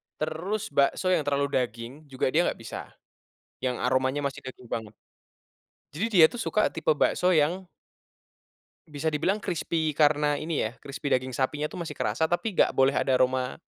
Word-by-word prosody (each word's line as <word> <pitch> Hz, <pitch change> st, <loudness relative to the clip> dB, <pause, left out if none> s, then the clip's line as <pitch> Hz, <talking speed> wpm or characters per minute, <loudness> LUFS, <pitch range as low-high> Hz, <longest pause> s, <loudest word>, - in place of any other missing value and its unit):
Terus 170 Hz, +6 st, -3 dB
bakso 140 Hz, +6 st, +2 dB
yang 170 Hz, -4 st, +2 dB
terlalu 140 Hz, 0 st, +1 dB
daging, 115 Hz, 0 st, -4 dB
juga 130 Hz, -1 st, -1 dB
dia 165 Hz, -, +4 dB
nggak -, -, -3 dB
bisa. -, -, -7 dB, 0.8 s
Yang 125 Hz, -1 st, 0 dB
aromanya 130 Hz, +2 st, +1 dB
masih 140 Hz, -, -3 dB
daging 125 Hz, -1 st, -10 dB
banget. 110 Hz, -2 st, -4 dB, 1.0 s
Jadi 185 Hz, +10 st, -1 dB, 0.2 s
dia -, -, +11 dB
tuh 245 Hz, -, -8 dB
suka 215 Hz, -1 st, +1 dB
tipe 160 Hz, -1 st, +1 dB
bakso 180 Hz, +4 st, +2 dB
yang 170 Hz, +5 st, +1 dB, 1.2 s
bisa 150 Hz, +2 st, -2 dB
dibilang 165 Hz, +7 st, +1 dB
krispi 160 Hz, -3 st, -1 dB
karena 145 Hz, 0 st, +2 dB
ini 160 Hz, 0 st, -1 dB
ya, 110 Hz, -, -2 dB
krispi 140 Hz, +1 st, -5 dB
daging 130 Hz, -1 st, 0 dB
sapinya 150 Hz, +3 st, -1 dB
tuh -, -, -8 dB
masih 155 Hz, -, -6 dB
kerasa 120 Hz, +3 st, -1 dB
tapi 175 Hz, +4 st, -1 dB
nggak -, -, +4 dB
boleh 135 Hz, +1 st, +3 dB
ada 135 Hz, -, +1 dB
aroma 130 Hz, +3 st, 0 dB
145 Hz, 165 wpm, -27 LUFS, 130-160 Hz, 1.2 s, dia